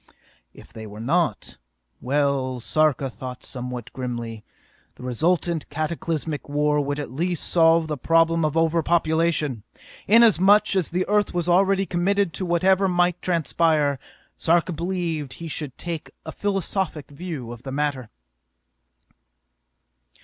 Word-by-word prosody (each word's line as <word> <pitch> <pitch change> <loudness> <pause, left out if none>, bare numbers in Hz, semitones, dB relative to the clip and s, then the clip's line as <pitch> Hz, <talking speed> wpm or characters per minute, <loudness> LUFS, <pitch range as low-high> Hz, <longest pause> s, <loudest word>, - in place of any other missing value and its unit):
If - - -16
they 110 -1 -8
were 105 +1 -10
not... 150 - -1 0.4
well, 135 -2 0
Sarka 150 +1 +1
thought 125 0 -8
somewhat 125 -2 -6
grimly, 120 -3 -5 0.5
the - - -13
resultant 165 +6 0
cataclysmic 155 0 -3
war 150 0 +2
would 145 0 -2
at 145 - -5
least 170 +5 -2
solve 165 -1 +4
the 150 -3 -4
problem 165 +2 +3
of 155 +1 0
over 165 0 +2
population! 160 -5 +1 0.5
Inasmuch 210 -2 +5
as 185 -4 +1
the 180 +2 -1
Earth 205 -2 +1
was 175 -1 0
already 195 +2 +3
committed 190 0 0
to 185 +4 -3
whatever 190 +3 +3
might 175 -1 +1
transpire, 160 -4 +1 0.4
Sarka 170 +2 +2
believed 165 -4 -3
he 170 - -8
should 150 -4 -4
take 170 -3 -5 0.2
a 160 - -5
philosophic 190 -7 -2
view 145 -6 -6
of 120 -1 -9
the 135 - -7
matter! 135 -4 -2
160 Hz, 130 wpm, -23 LUFS, 140-175 Hz, 0.5 s, Inasmuch